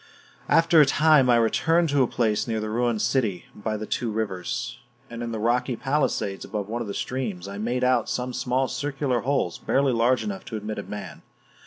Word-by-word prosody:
After 165 -1 +6
a - - +7
time 150 -2 +4
I 120 - +6
returned 135 +9 +2
to 145 -1 +3
a 130 - +3
place 110 -2 0
near 110 -1 -1
the 110 0 -4
ruined 120 -1 0
city 110 -6 0
by 110 +1 -3
the 110 - -5
two 120 +2 -2
rivers; 110 +3 -3 0.3
and 115 0 -6
in 120 -1 -3
the 115 - -3
rocky 120 +3 +1
palisades 135 -7 -1
above 105 -2 -4
one 115 +2 -3
of 115 - -4
the 100 - -5
streams, 110 -8 -3
I 100 +1 -6
made 120 +4 -1
out 125 -3 +2
some 125 0 -2
small 130 +2 0
circular 135 -3 -1
holes 130 -9 -1
barely 135 -1 +1
large 120 +2 +2
enough 195 -2 -5
to 110 - -5
admit 105 0 -5
a - - -5
man. 105 -1 -8
120 Hz, 205 wpm, -25 LUFS, 110-135 Hz, 0.3 s, a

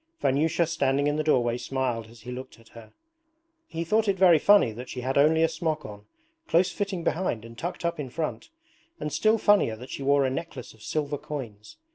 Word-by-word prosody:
Vanyusha 160 +5 +2
standing 140 -3 0
in 145 +1 +1
the 155 - 0
doorway 120 -5 +2
smiled 125 -4 -2
as 115 0 -16
he 125 +3 -8
looked 130 -1 -8
at 115 - -20
her. 115 -2 -14 0.8
He 165 -1 -4
thought 215 +6 +1
it 195 -1 +1
very 175 -4 +6
funny 200 - +5
that 120 +4 -9
she 125 - -5
had 130 +2 -2
only 155 +3 +4
a - - +5
smock 160 -1 -3
on, 105 0 -10 0.4
close 175 +2 +3
fitting 195 -4 -3
behind 155 -12 -1
and 115 0 -11
tucked 175 +6 -5
up 170 -2 -1
in 135 -3 -4
front, 160 - -4 0.5
and 150 - -4
still 220 +1 +3
funnier 205 - +3
that 125 +4 -11
she - - -6
wore 140 0 +3
a 130 - 0
necklace 135 -3 -6
of 110 - -21
silver 145 +2 -2
coins. 120 -9 -8
145 Hz, 210 wpm, -26 LUFS, 125-165 Hz, 0.8 s, very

